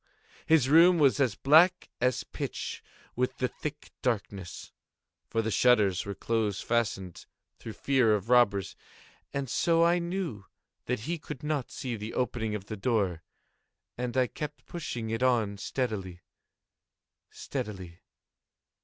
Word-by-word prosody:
His 160 Hz, -5 st, +5 dB
room 170 Hz, +5 st, +7 dB
was 145 Hz, -3 st, +4 dB
as 125 Hz, -7 st, +2 dB
black 170 Hz, +6 st, +4 dB
as 125 Hz, 0 st, +1 dB
pitch -, -, -5 dB, 0.3 s
with 125 Hz, +1 st, -1 dB
the 130 Hz, -, +1 dB
thick 150 Hz, +3 st, -7 dB
darkness, 100 Hz, -7 st, -3 dB, 0.6 s
(for 115 Hz, -, 0 dB
the 110 Hz, -, -1 dB
shutters 105 Hz, -7 st, +3 dB
were 100 Hz, -, -4 dB
close 110 Hz, -3 st, -1 dB
fastened, 100 Hz, -6 st, -2 dB, 0.3 s
through 115 Hz, -, -7 dB
fear 125 Hz, -5 st, +3 dB
of 105 Hz, 0 st, -4 dB
robbers,) 115 Hz, -6 st, +3 dB, 0.6 s
and 140 Hz, -1 st, -3 dB
so 165 Hz, +6 st, +2 dB
I 175 Hz, +1 st, +3 dB
knew 170 Hz, -, -4 dB, 0.4 s
that 125 Hz, -3 st, -2 dB
he 165 Hz, +8 st, -3 dB
could 145 Hz, -1 st, -8 dB
not 150 Hz, -4 st, -1 dB
see 125 Hz, -3 st, -4 dB
the 105 Hz, +1 st, -6 dB
opening 110 Hz, -3 st, -1 dB
of 100 Hz, -2 st, -6 dB
the 110 Hz, -, -5 dB
door, 95 Hz, -6 st, 0 dB, 0.7 s
and 125 Hz, +1 st, -3 dB
I 130 Hz, -, +4 dB
kept 150 Hz, +4 st, -7 dB
pushing 120 Hz, -9 st, -5 dB
it 115 Hz, +1 st, -2 dB
on 115 Hz, -6 st, +2 dB
steadily, 100 Hz, -9 st, -3 dB, 1.1 s
steadily. 95 Hz, -4 st, -6 dB
120 Hz, 135 wpm, -29 LUFS, 105-140 Hz, 1.1 s, room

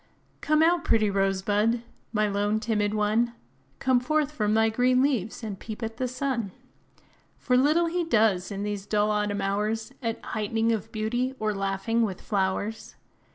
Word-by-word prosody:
Come 305 Hz, +1 st, +3 dB
out, 340 Hz, +1 st, +3 dB
pretty 215 Hz, -6 st, +2 dB
Rose 195 Hz, -1 st, +1 dB
Bud, 215 Hz, +4 st, +1 dB, 0.3 s
my 215 Hz, -1 st, +1 dB
lone, 205 Hz, +1 st, 0 dB
timid 215 Hz, -2 st, 0 dB
one! 215 Hz, +3 st, +1 dB, 0.4 s
Come 260 Hz, -2 st, +3 dB
forth 300 Hz, +3 st, 0 dB
from 215 Hz, -7 st, 0 dB
thy 225 Hz, 0 st, +4 dB
green 250 Hz, +3 st, +3 dB
leaves, 240 Hz, -6 st, -1 dB
and 205 Hz, -3 st, -5 dB
peep 220 Hz, +1 st, -7 dB
at 225 Hz, 0 st, -4 dB
the 255 Hz, -, -1 dB
sun; 250 Hz, -5 st, -2 dB, 0.9 s
For 250 Hz, -, +1 dB
little 300 Hz, +7 st, +4 dB
he 345 Hz, +1 st, -1 dB
does, 215 Hz, -, +2 dB
in 200 Hz, 0 st, -4 dB
these 205 Hz, -1 st, -4 dB
dull 210 Hz, 0 st, +2 dB
autumn 210 Hz, -1 st, 0 dB
hours, 215 Hz, +5 st, -1 dB
At 230 Hz, -2 st, -2 dB
height'ning 225 Hz, +1 st, -1 dB
of 225 Hz, 0 st, -2 dB
beauty, 240 Hz, +4 st, -1 dB
or 215 Hz, -1 st, -1 dB
laughing 195 Hz, +4 st, -1 dB
with 200 Hz, -5 st, -1 dB
flowers. 200 Hz, +2 st, -2 dB
220 Hz, 165 wpm, -26 LUFS, 205-245 Hz, 0.9 s, thy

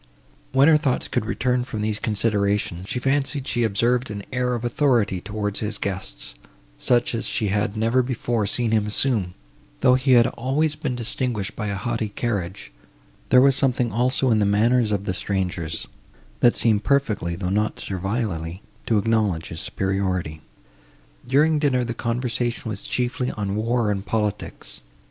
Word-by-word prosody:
When 135 Hz, +2 st, +5 dB
her 160 Hz, -1 st, +7 dB
thoughts 140 Hz, -4 st, -1 dB
could 105 Hz, -, -1 dB
return 125 Hz, 0 st, 0 dB
from 115 Hz, -4 st, -5 dB
these 105 Hz, 0 st, -1 dB
considerations, 100 Hz, -4 st, 0 dB
she -, -, -2 dB
fancied 135 Hz, +1 st, 0 dB
she 120 Hz, -, 0 dB
observed 120 Hz, +4 st, +1 dB
an 100 Hz, -1 st, -5 dB
air 125 Hz, -1 st, 0 dB
of 120 Hz, 0 st, -4 dB
authority 120 Hz, -8 st, +2 dB
towards 105 Hz, 0 st, -3 dB
his 105 Hz, -1 st, -2 dB
guests, -, -, -4 dB, 0.5 s
such 120 Hz, 0 st, +2 dB
as 115 Hz, -, -1 dB
she 105 Hz, -, 0 dB
had 105 Hz, +1 st, 0 dB
never 115 Hz, +4 st, +3 dB
before 120 Hz, -3 st, -1 dB
seen 120 Hz, +2 st, 0 dB
him 110 Hz, -2 st, +2 dB
assume, 105 Hz, -5 st, +1 dB, 0.5 s
though 125 Hz, -, +6 dB
he 130 Hz, +1 st, +3 dB
had 120 Hz, -1 st, +7 dB
always 135 Hz, +5 st, 0 dB
been 135 Hz, -4 st, -3 dB
distinguished 120 Hz, -3 st, -3 dB
by 105 Hz, -, -3 dB
a 100 Hz, -, -2 dB
haughty 110 Hz, +1 st, -2 dB
carriage; 100 Hz, -, -3 dB, 0.6 s
there 125 Hz, -, +7 dB
was 135 Hz, 0 st, +5 dB
something 125 Hz, -4 st, +1 dB
also 125 Hz, +2 st, +2 dB
in 110 Hz, -, +4 dB
the -, -, +3 dB
manners 110 Hz, +3 st, +3 dB
of 100 Hz, -1 st, 0 dB
the 95 Hz, -, -2 dB
strangers, 90 Hz, -4 st, -2 dB, 0.5 s
that 120 Hz, -, +5 dB
seemed 110 Hz, -3 st, +2 dB
perfectly, 105 Hz, -10 st, +1 dB
though 90 Hz, 0 st, -3 dB
not 105 Hz, +2 st, 0 dB
servilely, 95 Hz, -3 st, -3 dB, 0.2 s
to 110 Hz, -, +3 dB
acknowledge 105 Hz, -5 st, +1 dB
his 80 Hz, -, -6 dB
superiority. 95 Hz, -5 st, -2 dB, 0.9 s
During 150 Hz, +4 st, +3 dB
dinner, 130 Hz, -4 st, +2 dB
the 120 Hz, -1 st, -3 dB
conversation 120 Hz, 0 st, -2 dB
was 100 Hz, -2 st, -4 dB
chiefly 125 Hz, 0 st, -1 dB
on 100 Hz, -1 st, -3 dB
war 115 Hz, 0 st, +1 dB
and 100 Hz, -1 st, -2 dB
politics. 105 Hz, -1 st, -3 dB
110 Hz, 165 wpm, -23 LUFS, 100-125 Hz, 0.9 s, her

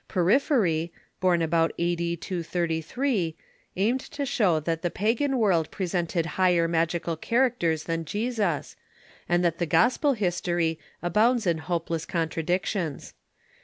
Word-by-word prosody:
Porphyry, 180 Hz, -, +2 dB, 0.3 s
born 180 Hz, -2 st, +2 dB
about 165 Hz, 0 st, +2 dB
a.d. 170 Hz, 0 st, -1 dB
233, 170 Hz, -, -2 dB, 0.4 s
aimed 225 Hz, +7 st, +1 dB
to 285 Hz, +1 st, -5 dB
show 190 Hz, -11 st, +2 dB
that 165 Hz, +1 st, -2 dB
the 175 Hz, -, 0 dB
pagan 235 Hz, +9 st, 0 dB
world 185 Hz, -9 st, +2 dB
presented 175 Hz, -3 st, -1 dB, 0.2 s
higher 175 Hz, -2 st, +4 dB
magical 165 Hz, 0 st, 0 dB
characters 175 Hz, -6 st, +1 dB
than 165 Hz, -1 st, -2 dB
Jesus, 205 Hz, -, -2 dB, 0.5 s
and 175 Hz, +1 st, +2 dB
that 170 Hz, -1 st, 0 dB
the 175 Hz, -, 0 dB
gospel 245 Hz, -, +3 dB
history 175 Hz, -5 st, -1 dB, 0.2 s
abounds 220 Hz, +7 st, +2 dB
in 170 Hz, -3 st, +1 dB
hopeless 165 Hz, -1 st, -3 dB
contradictions. 170 Hz, 0 st, -2 dB
175 Hz, 120 wpm, -26 LUFS, 165-210 Hz, 0.5 s, higher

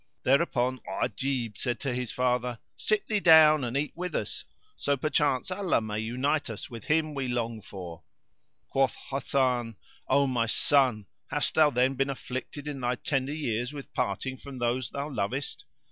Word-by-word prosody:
Thereupon 130 Hz, -3 st, +2 dB
Ajib 125 Hz, -6 st, -2 dB
said 120 Hz, -3 st, -1 dB
to 135 Hz, -3 st, -1 dB
his 125 Hz, -1 st, -2 dB
father, 125 Hz, -1 st, 0 dB, 0.2 s
"Sit 215 Hz, -1 st, 0 dB
thee 215 Hz, -1 st, +1 dB
down 155 Hz, -4 st, +7 dB
and 120 Hz, +2 st, -1 dB
eat 145 Hz, +1 st, -1 dB
with 180 Hz, +1 st, -4 dB
us; -, -, -2 dB, 0.3 s
so 140 Hz, 0 st, 0 dB
perchance 145 Hz, +2 st, +1 dB
Allah 185 Hz, -5 st, +1 dB
may 110 Hz, -1 st, -3 dB
unite 130 Hz, +6 st, 0 dB
us 110 Hz, +1 st, -6 dB
with 115 Hz, -3 st, -8 dB
him 155 Hz, 0 st, +1 dB
we 135 Hz, -2 st, -2 dB
long 115 Hz, -2 st, -2 dB
for." 90 Hz, -5 st, -8 dB, 0.7 s
Quoth 135 Hz, -1 st, +2 dB, 0.2 s
Hasan, 130 Hz, -4 st, 0 dB, 0.3 s
"O 140 Hz, +1 st, +4 dB
my 120 Hz, -4 st, +1 dB
son, 125 Hz, -4 st, +3 dB, 0.2 s
hast 145 Hz, +1 st, 0 dB
thou 155 Hz, -2 st, +6 dB
then 130 Hz, 0 st, +2 dB
been 135 Hz, +1 st, 0 dB
afflicted 135 Hz, +2 st, -5 dB
in 145 Hz, -2 st, -4 dB
thy 125 Hz, 0 st, +1 dB
tender 135 Hz, +1 st, -1 dB
years 120 Hz, -3 st, -2 dB
with 140 Hz, -2 st, -9 dB
parting 130 Hz, +7 st, -2 dB
from 140 Hz, -1 st, -9 dB
those 120 Hz, +1 st, 0 dB
thou 140 Hz, +1 st, -4 dB
lovest?" 130 Hz, +1 st, -3 dB
130 Hz, 165 wpm, -28 LUFS, 120-145 Hz, 0.7 s, down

